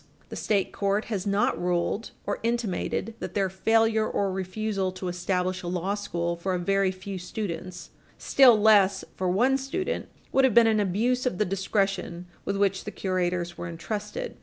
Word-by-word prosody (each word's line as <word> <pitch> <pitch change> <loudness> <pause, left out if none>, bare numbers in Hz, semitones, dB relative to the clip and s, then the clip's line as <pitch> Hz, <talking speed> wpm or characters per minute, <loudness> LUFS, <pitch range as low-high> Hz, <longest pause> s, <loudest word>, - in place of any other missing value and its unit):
The - - -7
state 200 -3 0
court 200 +1 0
has 195 0 -2
not 200 -4 +1
ruled 180 +5 -1 0.2
or - - -2
intimated 230 -1 -1
that - - -6
their 195 -2 +1
failure 225 +3 +2
or 200 -1 0
refusal 190 +1 -2
to 185 0 -4
establish 180 +1 -1
a 175 - -6
law 180 +2 -1
school 170 -4 -2
for 185 +2 -2
a - - 0
very 195 +2 +1
few 190 +1 -6
students, 180 -1 -6 0.3
still 250 -5 +6
less 200 -3 +5
for 185 -1 -1
one 250 +9 +3
student, 275 +8 -3 0.2
would 270 - +3
have 260 -5 +3
been 235 -1 +8
an 220 -1 +3
abuse 230 +7 +1
of 215 - -2
the 210 - +2
discretion 195 -2 -1 0.2
with 200 - -1
which 195 -1 +1
the - - -3
curators 180 -3 -2
were 170 - -4
entrusted. 210 - -5
195 Hz, 175 wpm, -26 LUFS, 180-215 Hz, 0.3 s, been